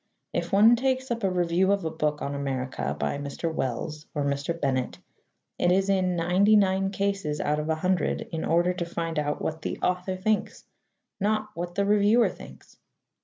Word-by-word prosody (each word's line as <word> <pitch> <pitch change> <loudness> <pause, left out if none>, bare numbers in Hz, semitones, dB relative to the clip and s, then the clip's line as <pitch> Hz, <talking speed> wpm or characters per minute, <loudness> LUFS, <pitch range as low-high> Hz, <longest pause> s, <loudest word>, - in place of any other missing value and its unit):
If - - -2
one 215 +4 +7
takes 260 +1 -1
up 230 -2 -2
a 195 - +3
review 180 +1 +2
of 200 -4 0
a 160 - -1
book 150 -2 -1
on 140 - -3
America 135 -2 -3
by 140 - -1
Mr. 145 +3 -4
Wells 150 +3 -3
or 145 - 0
Mr. 140 +4 -2
Bennett, 130 -3 -1 0.6
it 175 - +3
is 195 +1 +2
in 185 -2 +2
ninety 180 +5 +3
nine 195 -1 +3
cases 195 -6 -2
out 150 +1 0
of 150 +1 -3
a 160 - +2
hundred 180 +2 0
in 160 -1 -3
order 175 +2 +2
to 180 -1 -3
find 165 -2 -3
out 150 0 -2
what 160 0 -3
the - - -3
author 180 +1 0
thinks, 210 +3 -1 0.5
not 215 +1 0
what 175 -1 -5
the 200 - +1
reviewer 210 +3 +4
thinks. - - -13
175 Hz, 185 wpm, -26 LUFS, 155-200 Hz, 0.6 s, one